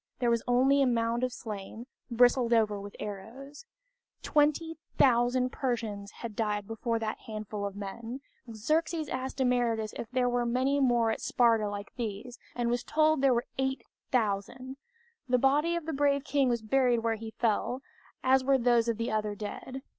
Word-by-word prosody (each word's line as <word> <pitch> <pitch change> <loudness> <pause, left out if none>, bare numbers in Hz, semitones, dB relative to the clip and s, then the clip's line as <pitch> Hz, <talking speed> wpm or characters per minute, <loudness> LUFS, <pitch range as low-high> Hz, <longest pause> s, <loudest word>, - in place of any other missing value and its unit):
There 240 -1 +1
was 235 -1 +2
only 265 +3 +4
a 270 - +4
mound 235 0 0
of 255 - 0
slain, 220 -1 -7 0.2
bristled 245 0 +4
over 210 -3 +2
with 200 0 -9
arrows. 240 - -8 0.6
Twenty 305 +2 +1 0.2
thousand 250 0 +3
Persians 225 -8 -3
had 225 0 -8
died 210 -2 -1
before 230 +2 -2
that 220 -1 -3
handful 215 -2 -4
of 200 - -8
men! 225 +6 -6 0.3
Xerxes 310 +8 0
asked 260 +1 -4
Demaratus 240 -4 +1
if 225 - -6
there 255 -1 +1
were 245 0 +1
many 260 +4 +1
more 240 -4 +3
at - - -4
Sparta 230 -3 +2
like 205 0 -7
these, 235 +1 -5 0.2
and 240 -1 0
was 240 0 -1
told 310 -2 +2
there 275 -1 +5
were 240 -1 +1
8,000. 255 -1 -2 0.5
The 250 - +4
body 290 +6 +2
of 340 -2 -3
the 320 - -3
brave 280 0 +2
king 275 -2 +1
was 235 -2 -1
buried 245 0 +2
where 230 -1 +1
he 220 0 -7
fell, 240 +3 0 0.4
as 260 0 +4
were 270 +1 +4
those 240 -2 +3
of 230 -2 0
the 230 0 -2
other 215 -1 -1
dead. 255 +6 -7
240 Hz, 170 wpm, -29 LUFS, 220-265 Hz, 0.6 s, there